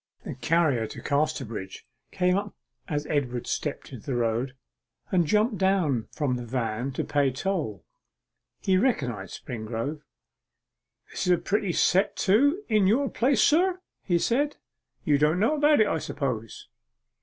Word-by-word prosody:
The - - -5
carrier 135 -3 +1
to - - -9
Casterbridge 135 -10 -2 0.2
came 180 0 +1
up 200 +1 -3 0.3
as 150 -3 -2
Edward 125 -6 -1
stepped 145 -2 -4
into 120 - -9
the 135 - -3
road, 120 +2 -1 0.6
and 175 -4 +2
jumped 210 +4 +2
down 180 - +1
from 135 -5 -1
the 120 - -5
van 120 +1 -2
to - - -2
pay 145 -2 +1
toll. 140 - -3 0.8
He 190 -1 +2
recognized 125 - -1
Springrove. 115 +6 -4 1.1
'This - - -3
is 180 - +5
a - - +3
pretty 195 +3 -1
set 190 +4 +2
to 285 - +3
in 215 -4 +3
your 260 +7 +2
place, 250 -2 +2
sir,' 360 +4 +3 0.2
he 175 -3 +1
said. 280 - 0 0.5
'You 145 -2 +3
don't 150 +4 +3
know 225 +9 +3
about 295 0 +4
it, - - +5
I 160 - 0
suppose? 135 -7 -4
155 Hz, 150 wpm, -26 LUFS, 125-200 Hz, 1.1 s, is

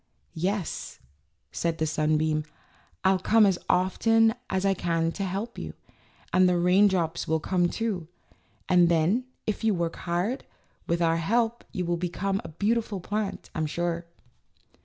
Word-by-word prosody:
"Yes," 185 +2 -3 0.5
said 165 -1 -1
the 160 - 0
sunbeam, 155 0 +1 0.6
"I'll 190 0 +4
come 220 +2 +5
as 190 -3 +2
often 225 +5 +3 0.2
as 190 +1 0
I 195 - +4
can 165 -2 0
to 195 - -4
help 195 +5 -4
you, - - -6 0.6
and 185 0 +5
the 180 - +2
raindrops 180 -2 +3
will 160 0 +1
come 175 +2 +1
too; 200 -8 -3 0.6
and 175 -2 +5
then, 175 +9 +2 0.2
if 215 +1 -2
you 220 -3 +3
work 170 -1 -2
hard, 180 +9 -2 0.4
with 170 0 +1
our 165 0 +3
help 230 +7 0
you 185 -4 -2
will 175 0 0
become 190 +3 -2
a - - -8
beautiful 210 +4 -1
plant, 205 +2 -4
I'm 155 -1 -1
sure." 170 +1 -2
180 Hz, 150 wpm, -27 LUFS, 170-205 Hz, 0.6 s, come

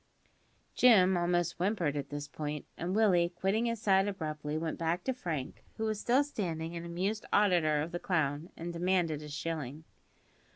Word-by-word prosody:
Jim 190 -7 +6
almost 175 -1 +1
whimpered 180 -6 0
at 145 - -3
this 145 0 -5
point, 150 -1 -5
and 180 +3 -3
Willie, 185 -6 +4
quitting 210 +6 +1
his 230 -1 -2
side 195 -2 +3
abruptly, 155 -5 -3
went 160 0 -3
back 170 +2 0
to 260 - 0
Frank 165 - -5
(who 220 - -1
was 215 -1 -1
still 250 +6 +3
standing 170 - -4
an 170 - -5
amused 185 +5 -2
auditor 170 -7 +3
of 165 - -6
the 175 - -3
clown), 155 -2 -1
and 170 +1 -5
demanded 170 -3 +1
a 150 - -8
shilling. 150 -1 -4
175 Hz, 170 wpm, -32 LUFS, 155-195 Hz, -, Jim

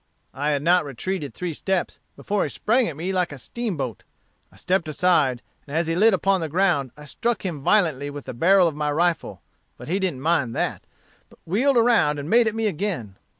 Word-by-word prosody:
I 145 +2 -1
had 145 -1 0
not 175 +2 +4
retreated 145 +3 -4
three 180 -2 -4
steps 190 +4 -2 0.2
before 205 0 -2
he - - 0
sprang 240 +3 +1
at 155 - -5
me 180 +4 -3
like 180 -3 0
a 145 - -8
steamboat; 150 - -4 0.5
I - - -21
stepped 180 - -1
aside 155 -6 +2 0.2
and 145 +3 -3
as 170 - +1
he 165 - -1
lit 215 +5 +5
upon 190 0 +1
the 160 - -3
ground, 170 -5 +1
I 150 - -11
struck 230 +8 -2
him 165 -6 -4
violently 150 -6 +2
with 145 -1 -8
the - - -6
barrel 180 +8 +4
of 160 - -2
my 150 0 -1
rifle, 170 +3 -1 0.3
but - - -10
he 190 +4 0
didn't 175 -9 -2
mind 140 -7 +1
that, - - -2 0.4
but - - -20
wheeled 245 - +2
around 230 -11 +3
and 145 0 -5
made 230 +5 +4
at 220 - -1
me 225 0 -1
again. 165 - -2
170 Hz, 210 wpm, -23 LUFS, 145-195 Hz, 0.5 s, lit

